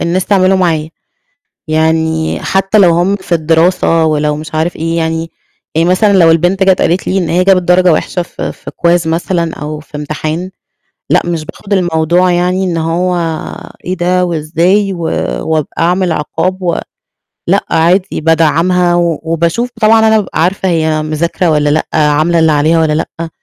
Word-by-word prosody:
الناس 180 +2 -1
تعمله 190 -1 +3
معايا. 160 -4 0 0.8
يعني، 160 0 0
حتى 195 +2 +1
لو 185 -4 +5
هُم 175 +4 +1
في 190 -2 -13
الدراسة 165 +1 +2
ولو 150 -1 0
مش 155 +1 -8
عارف 160 +3 -1
إيه 165 +1 -2
يعني 165 0 -2 0.4
يعني 165 +2 +2
مثلًا 200 +3 +3
لو 170 -4 +5
البنت 175 +4 +2
جات 190 -1 +3
قالت 175 +3 0
لي 190 - 0
إن 175 -4 -1
هي 180 +2 +2
جابت 190 -1 +3
درجة 180 0 +3
وحشة 180 - -2
ف 175 - -10
في - - -5
quiz 170 -1 +1
مثلًا 170 0 -1
أو 150 0 -6
في 150 0 -10
امتحان، 155 +4 -4 0.6
لأ - - +3
مش 165 -3 -3
باخد 200 +5 -6
الموضوع 175 0 +1
يعني، 180 +2 0
إن 175 -3 -2
هو 170 +3 -1 0.7
إيه 185 +1 -2
ده 180 +1 +1
وإزاي؟ 175 +5 0
و 175 - -8 0.5
وابق 155 -2 0
أعمل 180 +2 +1
عِقاب 165 +4 -2
و 175 -2 -1 0.7
لأ، - - +1
عادي 175 +3 +1
بادّعَمها 165 +3 +2
و 170 -2 0
وباشوف 165 +8 -1
طبعًا 220 0 +4
أنا 220 - +4
بابقى 200 -5 -2
عارفة 190 +2 0
هي 160 -2 0
مذاكرة 165 +3 -1
والّا 150 -1 +1
لأ، 155 - 0
عاملة 155 +2 +2
اللي 160 -1 +3
عليها 155 +3 +2
والّا 160 -1 +1
لأ. 165 +2 -4
170 Hz, 170 wpm, -12 LUFS, 160-185 Hz, 0.8 s, لو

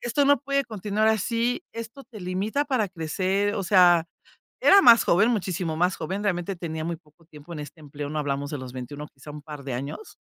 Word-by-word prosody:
Esto 280 +4 +1
no 285 0 +5
puede 275 0 0
continuar 215 0 -1
así, 230 - 0
esto 230 +4 -8
te 220 -6 -12
limita 195 +10 -1
para 255 -7 0
crecer". 190 +4 -1
O 195 - -2
sea, 175 -3 +5 0.6
era 400 -4 +8
más 235 -1 +8
joven, 205 +7 +4
muchísimo 180 -6 -2
más 180 +2 +1
joven, 190 +6 -4
realmente, 185 -1 -1
tenía 160 -2 -5
muy 170 0 -3
poco 160 +1 -26
tiempo 155 +1 -13
en 155 - -6
este 150 +2 -10
empleo, 145 -1 -7
¿no? 155 - -3
Hablamos 140 0 -2
de 150 - -4
los 130 -1 -8
21, 145 +4 -7
quizá, 135 +2 -12
un 150 0 -9
par 150 -2 -9
de 130 -3 -4
años. 140 - -7
180 Hz, 210 wpm, -25 LUFS, 150-220 Hz, 0.6 s, era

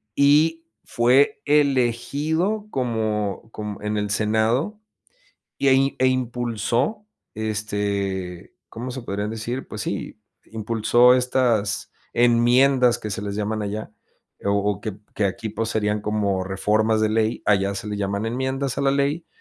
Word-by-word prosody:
y 155 +4 +4 0.2
fue 125 +4 +3
elegido 150 - +1
como 110 -5 -2
como 105 -2 -6
en 105 0 -1
el 105 0 -1
senado 110 - +1 0.8
y - - 0
eh 135 +1 +3
eh, 130 - +3
impulsó, 125 - -1 0.3
este, 100 -4 -3
¿cómo 120 +3 -6
se 130 0 -6
podrían 105 -1 -3
decir?, 115 +4 -4
pues 105 - -6
sí, 100 +1 -5 0.3
impulsó 115 +3 +3
estas 125 -4 +1 0.2
enmiendas 120 +2 +4
que 105 - -5
se 105 - -3
les 100 -1 -4
llaman 105 0 -2
allá, 105 +1 -4 0.5
o 100 - +2 0.2
o 100 - -9
que 110 -2 -4 0.2
que 105 - 0
aquí 110 +3 -4
pues, 115 +1 -3
serían 105 -1 0
como 100 -3 0
reformas 110 +3 +1
de 110 - +2
ley, 110 +1 0
allá 100 -1 +2
se 100 - -5
le 105 - -3
llaman 100 +1 -2
enmiendas 130 +2 -2
a - - 0
la 135 - +3
ley 140 +4 0
115 Hz, 140 wpm, -23 LUFS, 105-130 Hz, 0.8 s, y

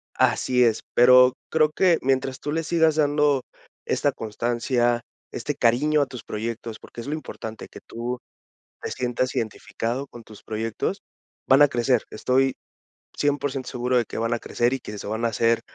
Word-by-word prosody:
Así 125 -1 +3
es, 115 -2 +2
pero 125 +1 +7 0.2
creo 155 -1 +3
que 175 +1 +3
mientras 130 0 0
tú 145 - -4
le 165 +2 -1
sigas 160 -1 +2
dando 145 -2 +2 0.4
esta - - +1
constancia, 120 +2 0 0.3
este 145 +4 -3
cariño 145 +6 +3
a 140 - +3
tus 125 -3 -9
proyectos, 115 +1 -5
porque 120 - -10
es 115 - -9
lo 145 - -2
importante, 115 -7 -7
que - - -11
tú 120 +2 -5 0.6
te - - -4
sientas 125 0 -1
identificado 115 +4 -3
con 120 -3 -12
tus 110 -2 -15
proyectos, 110 0 -3 0.5
van 135 +2 +6
a 145 - +9
crecer, 120 -2 +1
estoy 130 +4 +1 0.6
100% 145 -2 -1
seguro 125 +1 0
de 120 - +2
que - - -8
van 115 +1 0
a 120 - -1
crecer 120 +3 0
y 135 - -2
que 105 - -8
se - - -7
van 110 +2 -3
a 115 - +3
hacer 115 +1 +2
125 Hz, 175 wpm, -24 LUFS, 115-140 Hz, 0.6 s, a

